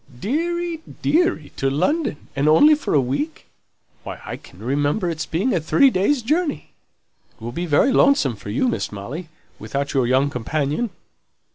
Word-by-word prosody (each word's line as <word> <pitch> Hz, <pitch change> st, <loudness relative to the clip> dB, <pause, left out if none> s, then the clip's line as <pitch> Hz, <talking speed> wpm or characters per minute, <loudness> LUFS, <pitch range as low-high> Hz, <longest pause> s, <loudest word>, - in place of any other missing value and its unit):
"Deary, 335 Hz, -, -2 dB, 0.2 s
deary, 330 Hz, -, +1 dB
to 135 Hz, -, +1 dB
London, 180 Hz, -, -1 dB
and 140 Hz, +2 st, +2 dB
only 295 Hz, -, +7 dB
for 295 Hz, -, -1 dB
a -, -, +6 dB
week! 145 Hz, +5 st, -3 dB, 0.6 s
Why, -, -, -8 dB
I -, -, -5 dB
can 90 Hz, -, -16 dB
remember 145 Hz, -, 0 dB
its 160 Hz, -, -4 dB
being 195 Hz, +11 st, 0 dB
a 175 Hz, -, +2 dB
three 270 Hz, -, +4 dB
days' 235 Hz, +7 st, +1 dB
journey! 310 Hz, +5 st, -1 dB, 0.7 s
It'll 115 Hz, +1 st, -6 dB
be 175 Hz, +7 st, -4 dB
very 155 Hz, -, +3 dB
lonesome 260 Hz, -, +3 dB
for 105 Hz, -, -10 dB
you, 120 Hz, -, +1 dB
Miss 240 Hz, -, -2 dB
Molly, 130 Hz, -, -7 dB, 0.3 s
without 140 Hz, +7 st, -3 dB
your 130 Hz, -3 st, +2 dB
young 135 Hz, +3 st, +2 dB
companion!" 145 Hz, -, -1 dB
155 Hz, 160 wpm, -21 LUFS, -, 0.7 s, only